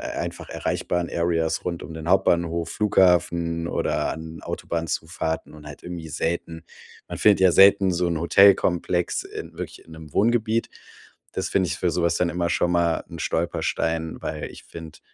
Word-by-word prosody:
einfach -, -, -5 dB
erreichbaren 90 Hz, -1 st, -2 dB
Areas 85 Hz, -1 st, 0 dB
rund 85 Hz, -2 st, -3 dB
um 80 Hz, -, -9 dB
den 80 Hz, 0 st, -7 dB
Hauptbahnhof, 85 Hz, -3 st, +2 dB
Flughafen 85 Hz, -4 st, +2 dB
oder -, -, -1 dB
an 80 Hz, 0 st, -9 dB
Autobahnzufahrten 80 Hz, -1 st, -3 dB
und 75 Hz, -1 st, -13 dB
halt 75 Hz, -, -11 dB
irgendwie 85 Hz, -2 st, -7 dB
selten 80 Hz, +1 st, -3 dB, 0.5 s
Man -, -, -5 dB
findet 105 Hz, -3 st, +4 dB
ja 95 Hz, -1 st, +6 dB
selten 95 Hz, +1 st, +6 dB
so 90 Hz, 0 st, 0 dB
'n 85 Hz, -, -1 dB
Hotelkomplex 90 Hz, 0 st, +3 dB
in -, -, -8 dB
wirklich -, -, -7 dB
in -, -, -18 dB
'nem 80 Hz, -2 st, -11 dB
Wohngebiet. 115 Hz, +1 st, +1 dB, 0.6 s
Das -, -, -2 dB
finde 95 Hz, -2 st, +1 dB
ich 85 Hz, -, -2 dB
für 90 Hz, -, 0 dB
sowas 85 Hz, -1 st, +1 dB
dann 90 Hz, 0 st, +1 dB
immer 85 Hz, 0 st, -1 dB
schon 90 Hz, 0 st, +1 dB
mal 85 Hz, -1 st, +1 dB
'n -, -, -9 dB
Stolperstein, 80 Hz, -1 st, -2 dB
weil -, -, -4 dB
ich -, -, -13 dB
finde 80 Hz, -2 st, -11 dB
85 Hz, 160 wpm, -24 LUFS, 80-90 Hz, 0.6 s, ja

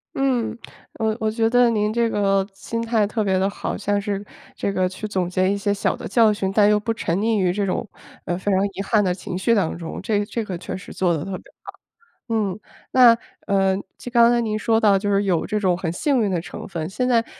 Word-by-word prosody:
嗯， 255 Hz, -4 st, 0 dB, 0.4 s
我 220 Hz, -1 st, -1 dB
我 220 Hz, -, 0 dB
觉 225 Hz, +1 st, +1 dB
得 245 Hz, 0 st, +4 dB
您 210 Hz, -2 st, +1 dB
这 235 Hz, -1 st, +1 dB
个 195 Hz, -2 st, +1 dB
心 230 Hz, +4 st, -4 dB
态 225 Hz, -2 st, +1 dB
特 215 Hz, +1 st, -1 dB
别 190 Hz, -2 st, +1 dB
地 195 Hz, +1 st, +1 dB
好。 -, -, -4 dB
像 205 Hz, 0 st, 0 dB
是 200 Hz, -1 st, -3 dB, 0.3 s
这 200 Hz, -, -2 dB
个 185 Hz, -1 st, +1 dB
去 190 Hz, +4 st, -6 dB
总 185 Hz, -4 st, -1 dB
结 185 Hz, +1 st, +1 dB
一 200 Hz, -, 0 dB
些 200 Hz, 0 st, 0 dB
小 200 Hz, -, 0 dB
的 -, -, -7 dB
教 220 Hz, 0 st, +4 dB
训， 195 Hz, -2 st, -2 dB
但 205 Hz, 0 st, +5 dB
又 210 Hz, -, +4 dB
不 225 Hz, +2 st, -2 dB
沉 170 Hz, -5 st, -2 dB
溺 220 Hz, 0 st, +1 dB
于 185 Hz, -2 st, +2 dB
这 200 Hz, +1 st, -1 dB
种 195 Hz, +4 st, -2 dB, 0.4 s
呃， 175 Hz, -, -1 dB
非 200 Hz, +2 st, -1 dB
常 190 Hz, +1 st, +3 dB
遗 195 Hz, -, -4 dB
憾 210 Hz, +1 st, +2 dB
的 180 Hz, -2 st, +1 dB
情 180 Hz, 0 st, -6 dB
绪 230 Hz, +5 st, +2 dB
当 195 Hz, -8 st, 0 dB
中。 165 Hz, -1 st, -6 dB
这 205 Hz, -2 st, 0 dB
这 225 Hz, +2 st, -3 dB
个 185 Hz, -4 st, -5 dB
确 180 Hz, -, -6 dB
实 185 Hz, -, -9 dB
做 180 Hz, -2 st, +1 dB
得 155 Hz, -, -3 dB
特 195 Hz, -, -6 dB
别 -, -, -16 dB, 0.2 s
好。 -, -, -8 dB, 0.6 s
嗯， 215 Hz, -3 st, -1 dB, 0.3 s
那 240 Hz, -3 st, +7 dB, 0.3 s
呃， 195 Hz, -1 st, +2 dB, 0.2 s
就 245 Hz, -, -8 dB
刚 235 Hz, -1 st, +6 dB
才 240 Hz, -, +3 dB
您 215 Hz, -2 st, -1 dB
说 225 Hz, +1 st, +2 dB
到， 205 Hz, -3 st, +4 dB
就 205 Hz, 0 st, -2 dB
是 200 Hz, +1 st, +2 dB
有 180 Hz, -4 st, +1 dB
这 210 Hz, 0 st, -1 dB
种 185 Hz, -3 st, +2 dB
很 175 Hz, -2 st, -2 dB
幸 260 Hz, -, +1 dB
运 205 Hz, -, +1 dB
的 175 Hz, -, 0 dB
成 -, -, -8 dB
分。 165 Hz, -4 st, -4 dB
现 250 Hz, +6 st, -1 dB
在 230 Hz, -2 st, +3 dB
205 Hz, 265 characters per minute, -22 LUFS, 190-225 Hz, 0.6 s, 那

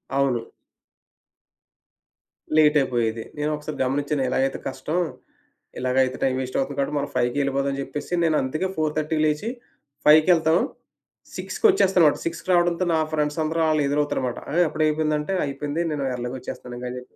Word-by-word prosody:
అవును. 135 Hz, -4 st, +1 dB, 2.1 s
లేటయిపోయేది. 130 Hz, -7 st, +3 dB
నేను 150 Hz, +1 st, -1 dB
ఒకసారి 150 Hz, +1 st, -7 dB
గమనించాను. 140 Hz, +1 st, -1 dB
ఇలాగైతే 135 Hz, 0 st, 0 dB
కష్టం 135 Hz, +6 st, -2 dB, 0.8 s
ఇలాగయితే 130 Hz, +1 st, +1 dB
టైం 130 Hz, -1 st, +2 dB
వేస్ట్ 130 Hz, 0 st, -3 dB
అవుతుంది 135 Hz, +1 st, -2 dB
కాబట్టి 140 Hz, +2 st, -1 dB
మనం 140 Hz, -, -2 dB
5కే 125 Hz, +2 st, +1 dB
ఎళ్ళిపోదామని 140 Hz, 0 st, -1 dB
జెప్పేసి 145 Hz, +5 st, -6 dB
నేనంతుకే 155 Hz, +2 st, +1 dB
4:30కి 155 Hz, 0 st, -1 dB
లేచి 155 Hz, +8 st, 0 dB, 0.6 s
ఫైవ్‌కెళ్తాం. 160 Hz, +2 st, +5 dB, 0.8 s
సిక్స్‌కొచ్చేస్తానుమాట. 195 Hz, -, +3 dB
6కి 165 Hz, +1 st, -4 dB
రావడంతో 175 Hz, 0 st, +2 dB
నా 160 Hz, -, +3 dB
ఫ్రెండ్సందరూ 155 Hz, +2 st, 0 dB
ఆళ్ళు 155 Hz, -1 st, +2 dB
ఎదురవుతారుమాట. 140 Hz, -4 st, -1 dB
ఆ! -, -, -3 dB
అప్పుడే 155 Hz, 0 st, 0 dB
అయిపోయిందంటే, 155 Hz, +2 st, 0 dB
అయిపోయింది 145 Hz, +3 st, -3 dB
నేను 145 Hz, -2 st, -2 dB
ఎర్లీ‌గొచ్చేస్తాను 125 Hz, 0 st, -6 dB
ఇంకా 125 Hz, -, -5 dB
అని 125 Hz, -, -6 dB
చెప్పి. 125 Hz, -, -17 dB
150 Hz, 125 wpm, -24 LUFS, 130-155 Hz, 2.1 s, ఫైవ్‌కెళ్తాం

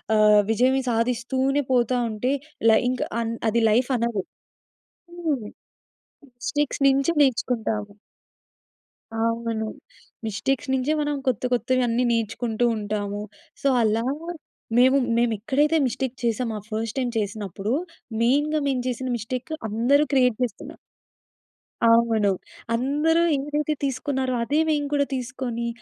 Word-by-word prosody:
ఆహ్, 210 Hz, -1 st, +6 dB
విజయమే 255 Hz, +4 st, +3 dB
సాధిస్తూనే 250 Hz, +4 st, +1 dB
పోతా 245 Hz, 0 st, +2 dB
ఉంటే, 220 Hz, +5 st, -1 dB, 0.4 s
లై 220 Hz, -, +6 dB
ఇంక 255 Hz, -, -2 dB, 0.2 s
అన్ 230 Hz, 0 st, -2 dB, 0.2 s
అది 235 Hz, +2 st, +1 dB
లైఫ్ 245 Hz, +5 st, +2 dB
అనరు. 235 Hz, -5 st, -1 dB, 1.0 s
హ్మ్. 295 Hz, -10 st, -1 dB, 0.9 s
మిస్టేక్స్ 290 Hz, +2 st, -1 dB
నుంచి 275 Hz, +5 st, +2 dB
నేర్చుకుంటాము. 225 Hz, -5 st, 0 dB, 1.2 s
అవును. 230 Hz, -1 st, -1 dB, 0.6 s
మిస్టేక్స్ 265 Hz, +6 st, -1 dB
నుంచే 265 Hz, +4 st, +1 dB
మనం 295 Hz, -1 st, -1 dB
కొత్త 250 Hz, -3 st, 0 dB
కొత్తవి 255 Hz, +2 st, +1 dB
అన్ని 240 Hz, +2 st, +1 dB
నేర్చుకుంటూ 225 Hz, +1 st, -1 dB
ఉంటాము. 205 Hz, -1 st, -3 dB, 0.4 s
సో, -, -, -1 dB, 0.2 s
అలా 220 Hz, +1 st, +1 dB, 0.7 s
మేము 260 Hz, +2 st, +6 dB, 0.2 s
మేము 240 Hz, -1 st, +2 dB
ఎక్కడైతే 295 Hz, +8 st, +2 dB
మిస్టేక్ 255 Hz, 0 st, -3 dB
చేసామో, 230 Hz, 0 st, 0 dB
ఆ -, -, -17 dB
ఫస్ట్ 225 Hz, +3 st, -3 dB
టైమ్ 245 Hz, -2 st, -1 dB
చేసినప్పుడు. 205 Hz, +1 st, -3 dB, 0.5 s
మెయిన్‌గా 295 Hz, +5 st, +2 dB
మేము 255 Hz, -2 st, 0 dB
చేసిన 255 Hz, +1 st, -3 dB
మిస్టేక్ 255 Hz, +7 st, -5 dB, 0.2 s
అందరూ 260 Hz, +7 st, +3 dB
క్రియేట్ 250 Hz, -4 st, +4 dB
చేస్తున్న 240 Hz, -5 st, -4 dB, 1.1 s
అవును. 230 Hz, -2 st, +4 dB, 0.5 s
అందరూ 295 Hz, +7 st, +2 dB, 0.2 s
ఏదైతే 295 Hz, +2 st, -1 dB
తీసుకున్నారో 265 Hz, -1 st, -1 dB
అదే 295 Hz, +5 st, +1 dB
మేము 290 Hz, -1 st, +1 dB
కూడా 285 Hz, -1 st, +2 dB
తీసుకొని, 250 Hz, -2 st, -3 dB
245 Hz, 115 wpm, -24 LUFS, 225-270 Hz, 1.2 s, ఆహ్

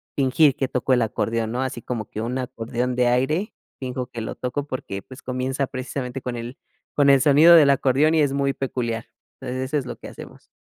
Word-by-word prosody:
fingir 140 Hz, +1 st, +3 dB
que 135 Hz, -, -1 dB
toco 130 Hz, +1 st, 0 dB
el 125 Hz, -, +3 dB
acordeón, 115 Hz, 0 st, -1 dB
¿no? 125 Hz, +2 st, -1 dB
Así 125 Hz, -3 st, -4 dB
como 110 Hz, -3 st, -4 dB
que 110 Hz, -, -6 dB
un 120 Hz, +3 st, -2 dB
acordeón 125 Hz, 0 st, -3 dB
de 125 Hz, 0 st, +2 dB
aire, 155 Hz, -, +1 dB, 0.3 s
finjo 125 Hz, -1 st, -4 dB
que 120 Hz, -2 st, -7 dB
lo 110 Hz, -, -5 dB
toco 140 Hz, +3 st, -3 dB
porque, 100 Hz, -8 st, -5 dB
pues, 130 Hz, +6 st, -13 dB
comienza 130 Hz, +2 st, -2 dB
precisamente 130 Hz, 0 st, -5 dB
con 125 Hz, -1 st, -4 dB
el 120 Hz, +4 st, -7 dB, 0.4 s
con 145 Hz, -1 st, +4 dB
el 140 Hz, -1 st, +7 dB
sonido 155 Hz, +4 st, +7 dB
del 145 Hz, -4 st, +7 dB
acordeón 140 Hz, +3 st, +3 dB
y 160 Hz, -, +4 dB
es 145 Hz, -2 st, +2 dB
muy 140 Hz, 0 st, 0 dB
peculiar. 120 Hz, -4 st, -3 dB, 0.3 s
Entonces, 130 Hz, 0 st, -3 dB
eso 145 Hz, +3 st, -1 dB
es 135 Hz, -, -6 dB
lo -, -, -5 dB
que -, -, -10 dB
hacemos. -, -, -12 dB
130 Hz, 215 wpm, -23 LUFS, 125-140 Hz, 0.4 s, el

